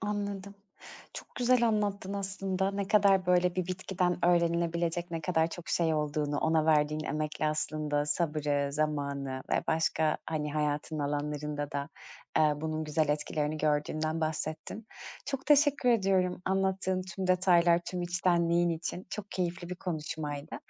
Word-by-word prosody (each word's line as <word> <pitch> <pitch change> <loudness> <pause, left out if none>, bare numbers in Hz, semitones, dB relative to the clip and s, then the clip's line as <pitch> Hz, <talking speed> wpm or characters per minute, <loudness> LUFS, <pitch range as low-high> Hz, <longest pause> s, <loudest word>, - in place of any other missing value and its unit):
Anladım. 200 -1 -3 0.6
Çok - - -9
güzel 245 -1 +3
anlattın 205 -3 -1
aslında. 195 -1 -1
Ne 200 0 -3
kadar 195 -3 +4
böyle, 180 0 +3
bir 185 -2 -1
bitkiden 180 -1 -1
öğrenilebilecek, 170 0 +1
ne 165 -1 -3
kadar 160 -1 +1
çok 175 +2 -8
şey 165 -2 +2
olduğunu, 150 -1 -1
ona 160 -1 +2
verdiğin 155 0 +2
emekle 155 +1 -2
aslında, 150 -1 -1
sabrı, 150 -3 0
zamanı 140 -3 -2
ve - - +2
başka, 160 -1 +1
hani, 150 -2 -2
hayatın 150 +1 -1
alanlarında 145 0 -3
da, 140 0 -3 0.5
aaa, 150 -2 +3
bunun 155 0 -2
güzel 155 0 0
etkilerini 150 +1 -1
gördüğünden 155 +1 0
bahsettin. 155 +7 -3 0.4
Çok 275 -2 -4
teşekkür 290 -3 +4
ediyorum 190 -5 +2
anlattığın 190 -1 0
tüm 185 +1 -5
detaylar, 175 -2 +4
tüm 180 -1 -3
içtenliğin 175 -1 +2
için. 170 +3 -4
Çok 205 +1 -6
keyifli 175 -1 -3
bir 180 - -4
konuşmaydı. 155 -4 -4
170 Hz, 135 wpm, -30 LUFS, 150-185 Hz, 0.6 s, kadar